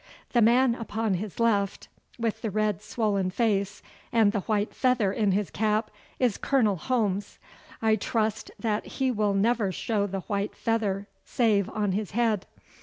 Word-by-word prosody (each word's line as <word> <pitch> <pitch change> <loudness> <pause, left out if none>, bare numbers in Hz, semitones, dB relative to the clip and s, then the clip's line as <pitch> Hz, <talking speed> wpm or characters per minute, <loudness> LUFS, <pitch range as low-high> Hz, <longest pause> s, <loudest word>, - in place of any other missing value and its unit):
The 240 - +3
man 240 +2 +5
upon 225 -3 -2
his 195 +3 -4
left, 205 -4 +1 0.3
with 230 -2 -2
the 225 - -2
red 210 -2 0
swollen 200 -5 0
face 200 -1 0 0.3
and 225 -3 +4
the 205 - -1
white 210 +1 -1
feather 245 -7 +2
in 210 -3 +1
his 200 0 0
cap, 215 +1 0 0.3
is 245 -5 +1
Colonel 230 -8 +2
Holmes. 205 0 -1 0.5
I 220 -1 +4
trust 220 0 -1
that 215 -2 -1
he 265 -1 +2
will 210 -3 +1
never 215 0 +2
show 205 +1 -1
the 195 0 -4
white 200 +2 -3
feather 205 -4 -1 0.2
save 210 -5 +1
on 210 -3 -1
his 205 +1 -2
head. 220 -5 +1
215 Hz, 160 wpm, -27 LUFS, 200-230 Hz, 0.5 s, man